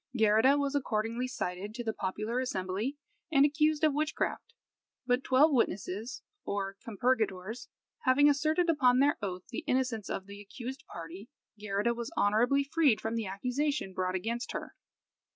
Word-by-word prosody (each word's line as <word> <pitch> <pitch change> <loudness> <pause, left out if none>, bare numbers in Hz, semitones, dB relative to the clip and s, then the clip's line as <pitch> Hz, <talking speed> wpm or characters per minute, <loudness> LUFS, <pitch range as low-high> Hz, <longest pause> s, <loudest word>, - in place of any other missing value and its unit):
Geirrida 225 +6 +5
was 280 -1 0
accordingly 235 -2 -1
cited 205 -4 -4
to 240 - -4
the 220 -1 -2
popular 215 +6 -2
assembly 215 +2 -2 0.3
and 280 -2 +6
accused 300 +1 +2
of 305 -2 +4
witchcraft. 305 +2 -2 0.5
But 250 +1 +1
twelve 275 +5 +5
witnesses, 220 0 -1 0.2
or 195 -1 -3
compurgators, 220 -2 -1 0.4
having 270 +3 +5
asserted 310 +4 +2
upon 255 -6 +4
their 280 +2 +3
oath 185 -3 -4
the 240 - -5
innocence 250 -5 0
of 190 - -3
the 200 +1 -10
accused 255 +7 -8
party, 175 +7 -8 0.3
Geirrida 210 +2 -1
was 235 0 -5
honourably 240 +7 +3
freed 280 -6 +3
from 220 +1 -3
the 225 -3 -2
accusation 250 +3 -2
brought 185 0 -1
against 230 +6 -3
her. - - -5
235 Hz, 150 wpm, -31 LUFS, 205-275 Hz, 0.5 s, and